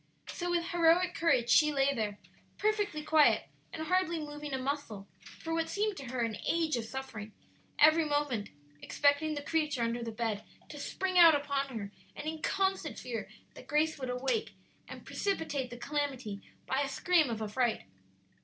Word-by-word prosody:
So 355 0 -4
with 345 0 0
heroic 350 +1 +4
courage 250 -8 +2
she 300 -1 +6
lay 275 -1 +2
there, 210 -5 -2 0.4
perfectly 415 -7 0
quiet 310 -1 +4 0.3
and 315 - -5
hardly 350 0 +1
moving 295 -1 -6
a 265 - -1
muscle 260 -7 -4 0.3
for 325 - -4
what 325 0 0
seemed 420 0 0
to 275 - -7
her 245 0 -3
an 230 -2 -1
age 325 -3 +1
of 235 -2 -3
suffering, 225 -4 -7 0.4
every 315 +2 +6
moment 290 -8 -1 0.3
expecting 290 +2 +2
the 290 - -4
creature 305 -6 0
under 230 +1 -1
the 230 - -4
bed 220 -2 -2 0.3
to 295 - -8
spring 370 +5 0
out 330 -3 +9
upon 275 -3 -2
her, 200 -2 -6 0.2
and 295 - -6
in 315 0 -4
constant 385 -5 0
fear 235 -3 -5 0.2
that - - -13
Grace 305 +1 +1
would 260 -2 -4
awake 260 - -1 0.3
and - - -10
precipitate 305 -10 -2
the 240 - -8
calamity 265 -7 -3 0.2
by 265 +1 0
a 280 - -1
scream 310 +1 +2
of 225 -2 -3
affright. 220 +2 0
290 Hz, 175 wpm, -31 LUFS, 245-325 Hz, 0.4 s, out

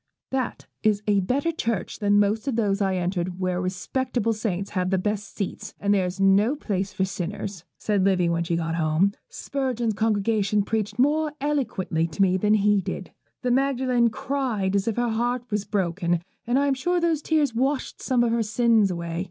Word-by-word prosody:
'That 260 -2 -2 0.2
is 215 -1 +2
a 205 -1 +3
better 270 - 0
church 230 - -3
than 205 -1 +3
most 210 +5 +1
of 265 - 0
those 205 -3 +1
I 190 -1 +1
enter 180 0 -1
where 185 0 -2
respectable 225 +5 -1
saints 200 -3 -3
have 185 -2 0
the 190 - +2
best 210 +2 -3
seats, 200 - -4
and 200 0 +2
there 190 -2 +2
is 180 +2 -6
no 200 +7 +4
place 200 -8 -2
for 190 -1 0
sinners,' 190 -1 -5
said 205 -3 0
Livy 185 -3 +3
when 170 0 +1
she 170 0 -1
got 165 -1 -1
home. 165 +4 +2 0.2
'Spurgeon's 250 -5 -2
congregation 210 -1 +1
preached 210 0 -2
more 300 +4 +2
eloquently 230 - -1
to 165 +4 -4
me 185 -1 +3
than 210 +3 +3
he 205 -1 +3
did. - - -5 0.3
The 250 - +1
Magdalen 255 -2 +2
cried 245 -6 -1
as 200 +1 +1
if 225 - 0
her 240 0 +1
heart 240 +2 0
was 210 -1 -1
broken, 175 -4 0 0.2
and 245 +2 +2
I 280 - +3
am 280 - +2
sure 350 +7 0
those 335 -3 +1
tears 300 -5 +1
washed 265 +4 -1
some 250 -3 +2
of 235 - +1
her 235 0 +1
sins 220 -1 +3
away. 170 -1 -3
210 Hz, 195 wpm, -25 LUFS, 190-245 Hz, 0.3 s, no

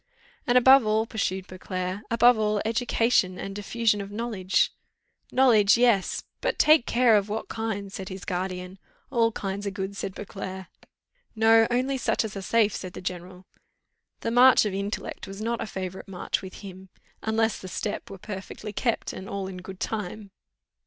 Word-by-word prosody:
"And 245 0 +5
above 265 +1 +7
all," 215 +1 +1
pursued 190 -4 -2
Beauclerc, 185 +1 -5
"above 240 +1 +5
all, 215 -1 0
education 225 -4 +1
and 195 - -5
the 205 +1 -6
diffusion 220 -1 +1
of 200 - -7
knowledge 205 -4 0 0.3
" - - -38
"Knowledge 225 -5 +5
yes, 235 -6 +2 0.2
but - - -1
take 305 -4 +5
care 240 -2 +4
of 205 0 +1
what 215 +2 -4
kind," 205 -3 -4
said 190 -1 -6
his 190 -1 -8
guardian. 185 0 -4 0.3
"All 230 -3 +3
kinds 200 -1 -4
are - - +1
good," 195 0 -5
said 195 -1 -5
Beauclerc. 190 -2 -7 0.7
"No, 225 0 +5
only 260 +2 0
such 230 - 0
as 215 - -6
are 195 - -4
safe," 215 0 +2
said 185 -1 -6
the - - -8
general. 180 0 -6 0.8
The 230 - -2
march 250 0 +6
of 205 - -2
intellect 200 +2 -4
was 195 +1 -8
not 230 +1 -2
a - - -3
favourite 190 -2 -6
march 190 -2 -2
with 190 -1 -10
him, 190 -1 -10 0.3
unless 220 0 0
the 185 - -8
step 205 +3 -4
were 195 - -8
perfectly 205 +2 -7
kept, 235 +2 -1
and 190 - -8
all 195 -1 -3
in 190 -1 -7
good 185 +1 -9
time. 210 -1 -4
205 Hz, 180 wpm, -26 LUFS, 190-225 Hz, 0.8 s, above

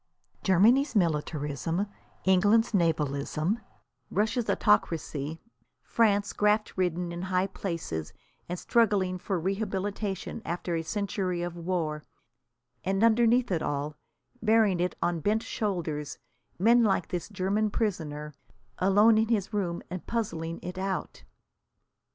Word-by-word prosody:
Germany's 230 - +4
militarism, 160 0 0 0.4
England's 205 +5 +4
navalism, 160 - 0 0.5
Russia's 220 +4 0
autocracy, 160 -6 +1 0.4
France, 205 -3 +2
graft 210 +1 +1
ridden 180 -1 -1
in 170 0 -5
high 185 0 +1
places 165 - -4 0.4
and 180 - -2
struggling 195 -4 +2
for 185 0 -2
rehabilitation 195 +2 -3
after 175 0 -3
a 165 - 0
century 190 -1 -2
of 175 -1 -4
war 165 -3 -2 0.8
and, 195 +3 0
underneath 235 +1 +4
it 165 -3 +1
all, 145 +1 -2 0.5
bearing 215 -4 +3
it 180 +1 0
on 175 -1 0
bent 215 +7 +1
shoulders, 165 -8 -3 0.4
men 235 +5 +5
like 195 -5 +1
this 180 -1 -4
German 200 +2 0
prisoner, 150 -9 -3 0.5
alone 210 +4 +5
in 220 - +2
his 215 -2 0
room 180 -4 -1
and 185 -1 -6
puzzling 165 -8 -2
it 180 +1 -5
out! 190 0 -3
185 Hz, 115 wpm, -28 LUFS, 170-210 Hz, 0.8 s, men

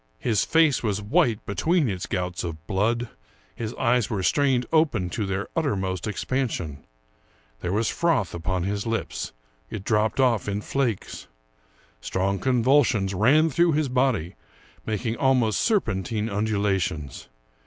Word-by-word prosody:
His 110 -5 +1
face 160 -4 +3
was 105 -3 -1
white 105 +1 +1
between 155 - +1
its 95 -3 -3
gouts 90 -1 -3
of 80 -2 -6
blood; 115 +6 0 0.5
his 110 -2 -4
eyes 125 -2 +1
were 100 -4 -2
strained 130 +1 +2
open 130 - +2
to 105 0 -2
their 95 +1 -2
uttermost 95 - -1
expansion. 105 - -3 0.8
There 90 - -3
was 110 +3 +1
froth 165 - +1
upon 90 +1 -2
his 100 +3 -2
lips; 115 0 -3 0.4
it 100 - -6
dropped 110 +2 +1
off 120 -6 +2
in 100 0 -2
flakes. 120 -4 -2 0.7
Strong 95 +7 -1
convulsions 125 -4 +2
ran 145 - +4
through 170 +3 +3
his 150 -2 +1
body, 125 -9 +1 0.5
making 110 +1 -2
almost 130 -5 +2
serpentine 110 - 0
undulations. 100 - -1
110 Hz, 130 wpm, -25 LUFS, 95-130 Hz, 0.8 s, ran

